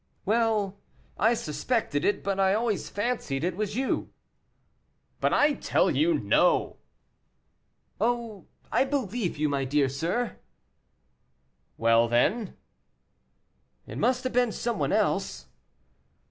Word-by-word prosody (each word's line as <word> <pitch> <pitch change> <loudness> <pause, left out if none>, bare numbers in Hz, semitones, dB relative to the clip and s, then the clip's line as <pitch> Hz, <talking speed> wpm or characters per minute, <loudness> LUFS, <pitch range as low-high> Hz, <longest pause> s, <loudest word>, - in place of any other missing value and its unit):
"Well, 215 -2 +1 0.4
I 225 +3 +4
suspected 150 - -2
it, 205 -1 +1
but 195 0 -1
I 195 0 +3
always 220 -2 -1
fancied 205 - -2
it 175 0 -1
was 210 +1 -3
you." 265 +2 -1 1.1
"But - - +1
I 295 0 +4
tell - - +1
you, 330 +1 +2
no!" - - +2 1.2
"Oh, 230 -5 -2 0.2
I - - +3
believe 245 - -2
you, 155 +1 +1
my 140 -2 -1
dear 135 +1 +1
sir." 175 - -2 1.4
"Well, 115 +1 +4
then 190 - +1 0.6
" - - -45
"It - - -7
must 255 +1 +1
have 255 - -3
been 245 -1 +2
some 235 -2 -3
one 140 - 0
else." - - -1
210 Hz, 120 wpm, -27 LUFS, 150-240 Hz, 1.4 s, I